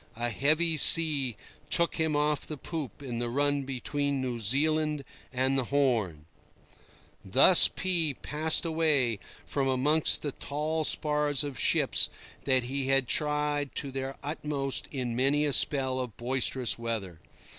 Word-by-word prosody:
A 120 Hz, +1 st, -3 dB
heavy 155 Hz, +6 st, +1 dB
sea 145 Hz, -8 st, +5 dB, 0.3 s
took 170 Hz, 0 st, +1 dB
him 160 Hz, -2 st, -1 dB
off 150 Hz, 0 st, -1 dB
the 155 Hz, -, -7 dB
poop 145 Hz, -, -8 dB
in 120 Hz, -3 st, -6 dB
the 120 Hz, 0 st, -3 dB
run 145 Hz, +2 st, -1 dB
between 140 Hz, +2 st, -3 dB
New 125 Hz, -2 st, -4 dB
Zealand 150 Hz, +6 st, 0 dB, 0.3 s
and 130 Hz, +1 st, -1 dB
the 130 Hz, -, -2 dB
Horn." 115 Hz, -, -1 dB, 1.0 s
Thus 135 Hz, -, +6 dB
P— 170 Hz, -6 st, -1 dB
passed 155 Hz, +5 st, +2 dB
away 150 Hz, -9 st, 0 dB, 0.3 s
from 135 Hz, -2 st, -3 dB
amongst 145 Hz, +4 st, +2 dB
the 145 Hz, -, -3 dB
tall 155 Hz, +4 st, -4 dB
spars 150 Hz, -2 st, 0 dB
of 140 Hz, -6 st, -6 dB
ships -, -, +2 dB, 0.4 s
that 130 Hz, -2 st, +2 dB
he 135 Hz, +2 st, -3 dB
had 135 Hz, -2 st, +2 dB
tried 150 Hz, -1 st, -1 dB
to 140 Hz, -, -4 dB
their 135 Hz, 0 st, -6 dB
utmost 145 Hz, -2 st, -4 dB
in 125 Hz, -4 st, -5 dB
many 140 Hz, +4 st, +1 dB
a 145 Hz, -, 0 dB
spell 130 Hz, -2 st, +3 dB
of 125 Hz, -5 st, -7 dB
boisterous 125 Hz, 0 st, -1 dB
weather. 110 Hz, -8 st, -5 dB
140 Hz, 145 wpm, -27 LUFS, 130-150 Hz, 1.0 s, Thus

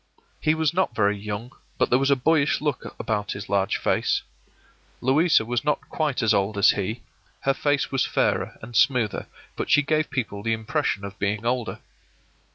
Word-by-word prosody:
He 155 Hz, 0 st, +2 dB
was 160 Hz, -1 st, +1 dB
not 180 Hz, -9 st, 0 dB
very 100 Hz, -1 st, +2 dB
young, 105 Hz, +4 st, -6 dB, 0.3 s
but -, -, +1 dB
there 125 Hz, -, +5 dB
was 135 Hz, +1 st, +1 dB
a 140 Hz, -, +5 dB
boyish 145 Hz, +2 st, +2 dB
look 145 Hz, -3 st, -3 dB
about 105 Hz, -2 st, -2 dB
his 100 Hz, -, -7 dB
large 100 Hz, -1 st, +1 dB
face. -, -, 0 dB, 0.8 s
Louisa 140 Hz, 0 st, +3 dB
was 120 Hz, 0 st, -1 dB
not 150 Hz, 0 st, +1 dB
quite 150 Hz, -6 st, -1 dB
as 110 Hz, -, +4 dB
old 100 Hz, +1 st, 0 dB
as 100 Hz, -, +6 dB
he, 105 Hz, +3 st, -3 dB, 0.4 s
her 135 Hz, -, +2 dB
face 145 Hz, +1 st, 0 dB
was 135 Hz, -2 st, +1 dB
fairer -, -, 0 dB
and 115 Hz, +2 st, -9 dB
smoother, 125 Hz, -3 st, +2 dB, 0.3 s
but -, -, -4 dB
she 145 Hz, -, +5 dB
gave 155 Hz, +1 st, 0 dB
people 110 Hz, -6 st, -3 dB
the 115 Hz, +2 st, 0 dB
impression 110 Hz, -2 st, -1 dB
of 100 Hz, 0 st, -9 dB
being 100 Hz, +2 st, -1 dB
older. 120 Hz, -1 st, -1 dB
120 Hz, 180 wpm, -24 LUFS, 105-145 Hz, 0.8 s, as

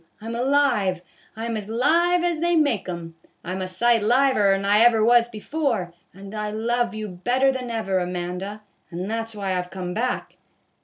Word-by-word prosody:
I 215 Hz, -, -12 dB
'm 230 Hz, -, -4 dB
alive, 240 Hz, -8 st, +1 dB, 0.3 s
I 225 Hz, +1 st, -5 dB
'm 230 Hz, -1 st, -2 dB
as 210 Hz, -1 st, -5 dB
live 335 Hz, +9 st, +2 dB
as 345 Hz, -2 st, 0 dB
they 345 Hz, +1 st, +2 dB
make 280 Hz, -, +1 dB
'um, 170 Hz, -2 st, -6 dB, 0.3 s
I 180 Hz, -, -5 dB
'm 190 Hz, +1 st, -3 dB
a 185 Hz, -, -2 dB
sight 230 Hz, +5 st, +2 dB
liver 240 Hz, -2 st, +3 dB
'n 195 Hz, 0 st, 0 dB
I 205 Hz, +1 st, +4 dB
ever 225 Hz, -2 st, +5 dB
was 240 Hz, 0 st, +5 dB
before. 225 Hz, -, -2 dB, 0.2 s
And 195 Hz, +2 st, -11 dB
I 210 Hz, -1 st, -3 dB
love 230 Hz, +2 st, -1 dB
you 215 Hz, 0 st, -4 dB
better 245 Hz, +9 st, +1 dB
than 255 Hz, -2 st, -5 dB
ever, 205 Hz, -5 st, -1 dB
Amanda; 180 Hz, +3 st, -4 dB, 0.3 s
and 180 Hz, +2 st, -5 dB
that 225 Hz, 0 st, -2 dB
's 225 Hz, -, -8 dB
why 195 Hz, -2 st, -2 dB
I've 180 Hz, 0 st, -3 dB
come 180 Hz, -1 st, -5 dB
back." 245 Hz, +4 st, -3 dB
220 Hz, 200 wpm, -23 LUFS, 190-245 Hz, 0.3 s, ever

